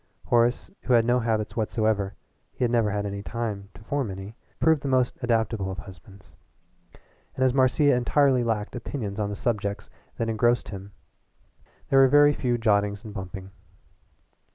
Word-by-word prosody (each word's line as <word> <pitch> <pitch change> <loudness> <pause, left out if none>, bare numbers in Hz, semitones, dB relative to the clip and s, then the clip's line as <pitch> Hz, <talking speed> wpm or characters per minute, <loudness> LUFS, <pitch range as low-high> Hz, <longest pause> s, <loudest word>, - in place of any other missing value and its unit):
Horace, 120 +1 +1
who 130 - 0
had 115 -1 +5
no 120 +1 +3
habits 110 -3 -1
whatsoever 110 -3 0 0.4
he - - -3
had 120 - +1
never 115 -3 +2
had 105 0 -2 0.2
time 105 0 -4
to 100 - -14
form 140 -1 -2
any 95 +3 -8 0.2
proved 160 -3 +3
the - - -4
most 130 -1 0
adaptable 115 -4 0
of 95 - -5
husbands, 95 0 -13 1.0
and 130 - 0
as 130 - +3
Marcia 135 +2 +3
entirely 130 +1 +3
lacked 110 -2 -2
opinions 110 -4 -5
on 105 -1 -1
the 105 - -4
subjects 100 -3 -3 0.3
that 115 - -1
engrossed 120 +2 +1
him 100 0 -8 1.0
there 135 - +5
were 135 - +7
very 145 +2 +6
few 125 -4 -1
jottings 105 -2 +1
and 110 - -9
bumping. 95 0 -7
115 Hz, 160 wpm, -25 LUFS, 100-125 Hz, 1.0 s, were